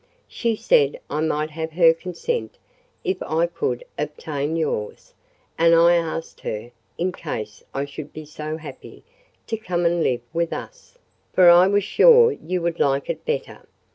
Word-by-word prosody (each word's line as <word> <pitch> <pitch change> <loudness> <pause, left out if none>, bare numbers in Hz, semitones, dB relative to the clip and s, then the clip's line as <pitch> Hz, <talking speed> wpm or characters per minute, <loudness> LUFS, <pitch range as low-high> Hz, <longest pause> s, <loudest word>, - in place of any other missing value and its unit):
"She 230 -2 -1
said 485 - +2
I 155 - -1
might 155 -1 -1
have 160 +1 -5
her 165 -1 +6
consent, 180 - -4 0.5
if 380 -2 -2
I 160 +2 +1
could 165 -8 -3 0.2
obtain 150 0 -3
yours; 150 -10 -3 0.5
and 165 0 +6
I 170 +1 +6
asked 165 -1 -2
her, 110 +3 -5 0.3
in 180 +2 0
case 110 -12 -6
I 140 +1 -2
should 145 +1 -9
be 155 0 -9
so 155 +1 -6
happy, 160 - -11 0.4
to 225 - -3
come 180 -5 -2
and 170 0 +2
live 125 -5 +1
with 170 0 -1
us—for - - 0
I 175 +2 +7
was 205 +1 +2
sure 465 - +6
you 180 - -4
would 170 0 -2
like 140 0 +1
it - - -9
better. 475 0 -3
165 Hz, 160 wpm, -22 LUFS, 155-185 Hz, 0.5 s, I